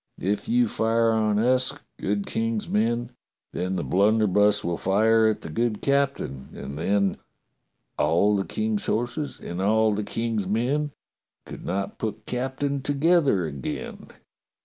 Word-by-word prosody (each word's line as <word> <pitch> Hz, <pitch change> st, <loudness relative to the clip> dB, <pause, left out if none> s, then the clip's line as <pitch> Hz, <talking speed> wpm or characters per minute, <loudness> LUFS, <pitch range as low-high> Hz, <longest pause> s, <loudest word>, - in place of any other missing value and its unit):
If 105 Hz, -, -1 dB
you 245 Hz, +1 st, +3 dB
fire 115 Hz, -, +2 dB
on 110 Hz, -2 st, +1 dB
us, 125 Hz, +3 st, +3 dB, 0.3 s
good 100 Hz, 0 st, -1 dB
King's 115 Hz, -1 st, -2 dB
men, 120 Hz, +3 st, 0 dB, 0.4 s
then 90 Hz, +2 st, -2 dB
the 85 Hz, -, -2 dB
blunderbuss 105 Hz, +1 st, +3 dB
will 85 Hz, 0 st, -1 dB
fire 110 Hz, +3 st, +3 dB
at 110 Hz, -, 0 dB
the -, -, -7 dB
good 115 Hz, +3 st, 0 dB
captain, 140 Hz, -, -1 dB
and 70 Hz, -, -7 dB
then: 100 Hz, +5 st, +1 dB, 0.8 s
"*A11 85 Hz, +7 st, +3 dB
the 95 Hz, -, -1 dB
King's 110 Hz, -1 st, -1 dB
horses 120 Hz, +6 st, -2 dB
and 85 Hz, +2 st, -5 dB
all 110 Hz, +2 st, +3 dB
the 105 Hz, +1 st, -2 dB
King's 115 Hz, -2 st, -2 dB
men 130 Hz, +9 st, 0 dB, 0.6 s
Could -, -, -9 dB
not 100 Hz, +2 st, -3 dB
put 110 Hz, -2 st, -4 dB
captain 135 Hz, +3 st, -2 dB
together 145 Hz, -, +2 dB
again.'" 70 Hz, -4 st, -6 dB
110 Hz, 140 wpm, -25 LUFS, 100-120 Hz, 0.8 s, you